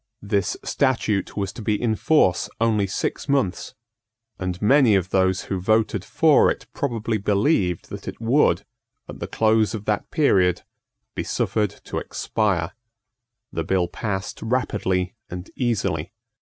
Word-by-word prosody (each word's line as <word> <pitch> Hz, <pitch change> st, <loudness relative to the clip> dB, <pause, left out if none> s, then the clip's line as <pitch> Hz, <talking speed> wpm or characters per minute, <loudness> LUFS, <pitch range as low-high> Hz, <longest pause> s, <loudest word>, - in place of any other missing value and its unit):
This 100 Hz, -1 st, 0 dB
statute 115 Hz, -9 st, 0 dB
was 100 Hz, -2 st, -2 dB
to -, -, -8 dB
be 105 Hz, -1 st, 0 dB
in 115 Hz, -3 st, +1 dB
force 105 Hz, -, +2 dB
only 110 Hz, -3 st, +2 dB
six 95 Hz, -, -3 dB
months; 135 Hz, -10 st, 0 dB, 0.6 s
and 90 Hz, -1 st, -3 dB
many 125 Hz, 0 st, +5 dB
of 95 Hz, -1 st, 0 dB
those 95 Hz, -1 st, +2 dB
who 95 Hz, -2 st, -3 dB
voted 110 Hz, -1 st, +1 dB
for 155 Hz, +7 st, +4 dB
it -, -, -3 dB
probably 115 Hz, -5 st, -2 dB
believed 100 Hz, -, +1 dB
that -, -, -8 dB
it -, -, -6 dB
would, 115 Hz, -, +2 dB, 0.4 s
at -, -, -9 dB
the -, -, -4 dB
close 110 Hz, 0 st, +2 dB
of 105 Hz, -1 st, -7 dB
that 105 Hz, -1 st, -1 dB
period, 95 Hz, -, +2 dB, 0.5 s
be -, -, -3 dB
suffered 105 Hz, -2 st, 0 dB
to -, -, -3 dB
expire. 95 Hz, -6 st, -1 dB, 0.8 s
The 80 Hz, -, -1 dB
bill 90 Hz, +1 st, +1 dB
passed 95 Hz, -1 st, -4 dB
rapidly 100 Hz, -6 st, -1 dB, 0.2 s
and 90 Hz, +1 st, -7 dB
easily. 100 Hz, -, -1 dB
105 Hz, 140 wpm, -23 LUFS, 95-115 Hz, 0.8 s, many